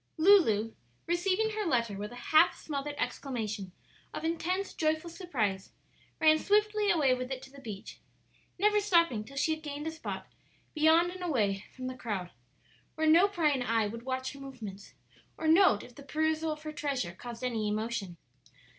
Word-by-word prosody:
'" - - -45
Lulu, 315 - +5 0.3
receiving 375 +5 +1
her 430 0 -2
letter 235 - 0
with 205 +2 -5
a - - -9 0.2
half 315 +3 +6
smothered 290 -1 -4
exclamation 220 -10 -3 0.4
of - - -5
intense, 360 +4 -1
joyful 315 +2 -1
surprise, 230 - -2 0.5
ran 310 -1 +5
swiftly 420 +1 +2
away 295 -8 +4
with 255 0 -3
it 265 - -2
to 265 - -12
the 280 0 -13
beach, 210 -5 -8 0.6
never 420 +2 +4
stopping 335 - +3
till 275 +5 -12
she 315 +3 +2
had 315 - -6
gained 295 -1 -6
a 320 - -2
spot 320 - -6 0.5
beyond 320 +3 +4
and 365 0 -8
away 210 - 0
from 255 - -7
the 255 - -3
crowd, 205 -8 -4 0.6
where 315 - 0
no 335 +5 +6
prying 310 -9 +1
eye 230 -3 +1
would 230 +3 -5
watch 260 +1 -3
her 280 - -12
movements 230 -8 -9 0.4
or 315 - -2
note 325 - +5
if 245 - -13
the 280 - -12
perusal 315 +2 0
of 305 0 -6
her 310 0 -5
treasure 275 - -2
caused 235 +5 -9
any 225 -4 -1
emotion. 210 -4 -3
285 Hz, 175 wpm, -30 LUFS, 230-335 Hz, 0.6 s, half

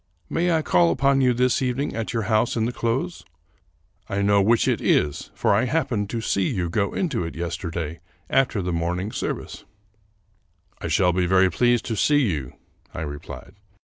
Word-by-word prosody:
May 175 +1 +1
I 160 -1 +2
call 85 - +3
upon 135 +9 +2
you 125 -1 +4
this 125 +2 +1
evening 130 +2 -1
at 115 -1 -3
your 115 -2 -1
house 110 +3 +1
in 110 - +1
the 120 - -1
close? 130 +10 -2 0.9
I 100 0 -1
know 100 0 +4
which 115 +4 +3
it - - +1
is, 75 0 +1
for - - +2
I 105 +5 +2
happened 120 -7 -1
to 115 0 -3
see 100 -3 0
you 85 -3 -2
go 100 +2 -1
into 150 - -1
it 80 - -6
yesterday 85 -1 -4 0.3
after 125 -7 +1
the 90 0 -2
morning 90 +5 -2
service." - - -5 0.6
" - - -40
I - - -3
shall 90 -2 +2
be 90 0 +1
very 95 0 +4
pleased 120 +5 +2
to 115 - -2
see 145 +7 +3
you," 70 -6 -4 0.4
I - - -6
replied. 75 +4 -8
105 Hz, 185 wpm, -23 LUFS, 90-125 Hz, 0.9 s, you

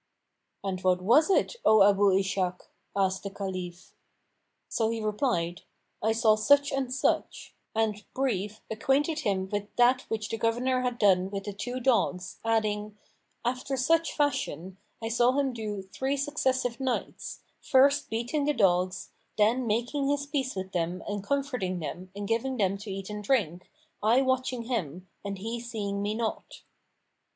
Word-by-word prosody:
"And 190 -2 -3
what 185 -1 +3
was 240 - +4
it, 395 +5 +2
O 215 -2 +7
Abu 200 0 +5
Ishak?" 190 -2 -1 0.3
asked 190 -1 +1
the 200 - -5
Caliph. 185 -3 -6 0.7
So 225 -1 0
he 230 0 -2
replied, 210 -6 -1 0.4
"I 220 - +2
saw 220 -1 +4
such 285 +6 +4
and 270 -2 -1
such;" 255 - -1 0.2
and, 215 -2 0
brief, 215 -5 -1
acquainted 280 +8 +1
him 195 -8 0
with 205 -1 -2
that 250 +1 +4
which 215 -1 -2
the 225 - -3
governor 250 +3 +1
had 250 -1 -1
done 190 -3 +4
with 195 0 -4
the 205 - -5
two 245 +5 -4
dogs, 230 -7 +1
adding, 215 -2 0 0.5
"After 255 +2 -1
such 330 +6 +2
fashion, 195 - -1 0.3
I - - -1
saw 240 +2 +3
him 275 -2 +1
do 210 -4 -4
three 265 +9 -2
successive 260 -4 0
nights, 260 -2 -3 0.2
first 280 +2 +4
beating 240 +7 -1
the 295 - +2
dogs, 185 -3 +1 0.3
then 230 +4 +3
making 245 +6 0
his 285 0 0
peace 275 -4 -2
with 190 0 -5
them 175 0 -2
and 205 -1 -3
comforting 250 -8 -1
them 175 +3 -6
and 205 0 -4
giving 245 +4 0
them 195 -3 +2
to 205 +1 -8
eat 195 +1 -5
and 210 0 -5
drink, 195 - 0 0.3
I 235 +5 +4
watching 255 -2 0
him, 185 - -3 0.2
and 200 -1 -4
he 225 +5 -4
seeing 210 -4 -3
me 205 +1 -1
not." 225 -1 -4
220 Hz, 160 wpm, -28 LUFS, 195-255 Hz, 0.7 s, O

